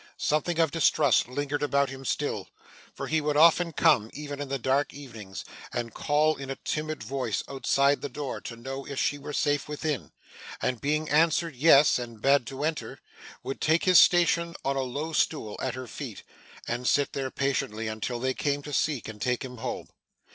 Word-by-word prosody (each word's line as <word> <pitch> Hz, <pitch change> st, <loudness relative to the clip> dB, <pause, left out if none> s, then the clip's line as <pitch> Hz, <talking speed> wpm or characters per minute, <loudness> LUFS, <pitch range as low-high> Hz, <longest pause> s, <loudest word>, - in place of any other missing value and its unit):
Something 155 Hz, +3 st, 0 dB
of 165 Hz, -3 st, +3 dB
distrust 165 Hz, -6 st, +3 dB
lingered 145 Hz, +2 st, -2 dB
about 140 Hz, -2 st, +1 dB
him 135 Hz, 0 st, -9 dB
still; -, -, -2 dB, 0.4 s
for -, -, -6 dB
he 160 Hz, 0 st, +1 dB
would 150 Hz, 0 st, 0 dB
often 170 Hz, +2 st, +5 dB
come, 145 Hz, -9 st, +3 dB
even 145 Hz, -1 st, -6 dB
in 145 Hz, -, -5 dB
the 135 Hz, -, -1 dB
dark 135 Hz, +3 st, 0 dB
evenings, 110 Hz, -9 st, -9 dB, 0.3 s
and 115 Hz, -1 st, -3 dB
call 155 Hz, +1 st, +2 dB
in 135 Hz, -1 st, -7 dB
a 135 Hz, -, -2 dB
timid 155 Hz, -3 st, -3 dB
voice 125 Hz, -2 st, -2 dB
outside 140 Hz, +1 st, +2 dB
the 145 Hz, -, -4 dB
door 140 Hz, +1 st, -5 dB
to 115 Hz, -, -7 dB
know 135 Hz, +4 st, -6 dB
if 140 Hz, 0 st, -5 dB
she 145 Hz, -, 0 dB
were 140 Hz, -, -7 dB
safe 145 Hz, 0 st, 0 dB
within; 150 Hz, -2 st, -3 dB, 0.5 s
and 125 Hz, -2 st, -1 dB
being 155 Hz, +2 st, 0 dB
answered 160 Hz, +1 st, +2 dB
yes, 145 Hz, 0 st, +6 dB
and 115 Hz, -2 st, -7 dB
bade 135 Hz, 0 st, +3 dB
to 135 Hz, +3 st, -5 dB
enter, 155 Hz, 0 st, -3 dB, 0.4 s
would 135 Hz, -, -5 dB
take 160 Hz, +2 st, +3 dB
his 185 Hz, -2 st, +7 dB
station 170 Hz, -1 st, +4 dB
on 135 Hz, 0 st, +1 dB
a 135 Hz, -, 0 dB
low 145 Hz, +5 st, -4 dB
stool 150 Hz, -8 st, 0 dB
at 130 Hz, -1 st, -2 dB
her 130 Hz, 0 st, -6 dB
feet, 115 Hz, -, -8 dB, 0.4 s
and 120 Hz, +1 st, -2 dB
sit 145 Hz, -1 st, +2 dB
there 135 Hz, -1 st, -2 dB
patiently 120 Hz, -5 st, -1 dB
until 110 Hz, +3 st, -3 dB
they 130 Hz, +2 st, 0 dB
came 145 Hz, +1 st, -1 dB
to 150 Hz, -, -7 dB
seek, 145 Hz, -3 st, 0 dB
and 105 Hz, -1 st, -9 dB
take 125 Hz, +1 st, 0 dB
him 125 Hz, -1 st, -9 dB
home. 125 Hz, +2 st, -5 dB
140 Hz, 190 wpm, -27 LUFS, 125-150 Hz, 0.5 s, his